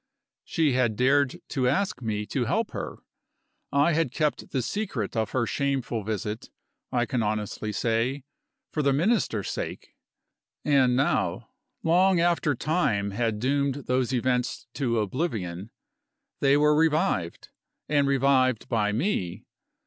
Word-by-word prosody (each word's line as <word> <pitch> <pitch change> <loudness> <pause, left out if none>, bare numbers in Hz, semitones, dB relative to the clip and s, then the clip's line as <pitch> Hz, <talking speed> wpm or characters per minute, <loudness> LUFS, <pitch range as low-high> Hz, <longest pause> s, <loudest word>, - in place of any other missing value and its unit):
She 160 -3 +1
had 120 -4 +2
dared 135 +3 +2
to 130 -2 0
ask 190 -4 0
me 105 -2 -2
to 125 +3 -1
help 215 - 0
her. - - -5 0.7
I 145 +4 +3
had 155 -5 +1
kept 150 +1 -1
the 130 -3 -1
secret 140 - -3
of 110 -2 0
her 130 -3 0
shameful 135 -5 -1
visit 110 +1 -4 0.4
I 120 -1 +1
can 120 +1 -1
honestly 105 0 -2
say, 115 +5 0 0.5
for 155 - -1
the 140 -1 +3
Minister's 160 - +1
sake. - - -6 0.7
And 135 -4 +4
now, 135 +3 0 0.3
long 180 +2 +4
after 170 -4 +2
time 115 - 0
had 115 +1 -1
doomed 140 +2 0
those 125 0 +1
events 125 0 0
to 120 -5 0
oblivion, 105 - -2 0.7
they 140 0 +4
were 150 0 +4
revived 150 - +1 0.4
and 145 -2 +2
revived 130 -3 +2
by 105 -3 +1
me. 105 - -2
130 Hz, 135 wpm, -26 LUFS, 115-150 Hz, 0.7 s, And